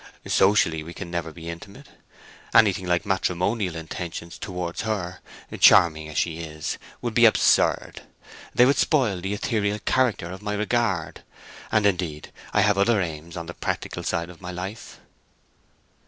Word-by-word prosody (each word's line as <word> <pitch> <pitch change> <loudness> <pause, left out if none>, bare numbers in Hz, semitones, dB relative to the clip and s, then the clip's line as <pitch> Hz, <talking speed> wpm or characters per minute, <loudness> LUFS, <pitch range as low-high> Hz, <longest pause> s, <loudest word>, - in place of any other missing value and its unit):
Socially 95 -5 +3
we 85 +2 -9
can 90 -3 -7
never 85 -2 -3
be 85 +1 -10
intimate. 100 - -9 0.7
Anything 95 -4 +4
like 90 +3 +1
matrimonial 95 0 0
intentions 85 +1 -6
towards 90 -3 -4
her, 100 -5 -3 0.4
charming 80 -2 +6
as 75 - -7
she 85 -1 0
is, 80 -2 -5 0.2
would - - -2
be - - +6
absurd. - - +3 0.5
They 125 - +7
would 140 +2 +3
spoil 120 - +2
the 95 +3 -2
ethereal 105 -1 -1
character 120 -9 +1
of 95 - -8
my 105 0 -3
regard. 105 -5 -1 0.5
And, 105 -1 +3
indeed, 90 -6 -1 0.2
I 105 - +3
have 100 -1 +3
other 110 +2 +3
aims 85 0 -5
on 85 - -5
the 85 - -7
practical - - -4
side 85 +1 -2
of 85 - -17
my 90 - -7
life." 95 +5 -7
90 Hz, 155 wpm, -24 LUFS, 85-105 Hz, 0.7 s, They